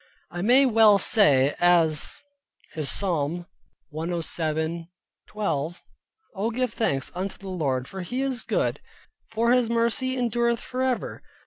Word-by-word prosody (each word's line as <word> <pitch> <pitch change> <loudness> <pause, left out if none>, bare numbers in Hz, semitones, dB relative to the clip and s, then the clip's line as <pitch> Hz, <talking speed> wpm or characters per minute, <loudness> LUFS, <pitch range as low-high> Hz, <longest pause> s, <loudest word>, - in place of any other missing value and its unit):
I 175 - -5
may 250 +7 +5
well 220 -4 +5
say 145 - +4
as 170 - +3 0.5
his 155 -3 0
Psalm 175 -2 -1 0.5
107.12 165 +1 -4 0.5
"Oh 210 +2 -2
give 245 0 -2
thanks 135 - -1
unto 185 +2 -5
the 195 - -11
Lord 135 -8 -2
for 190 - -7
he 250 +9 -3
is 260 -3 -2
good, - - -1 0.5
for 230 +2 +1
his 250 -2 +3
mercy 235 +3 0
endureth 235 -1 0
for 255 0 -5
ever." 260 -2 -2
195 Hz, 125 wpm, -25 LUFS, 160-235 Hz, 0.5 s, may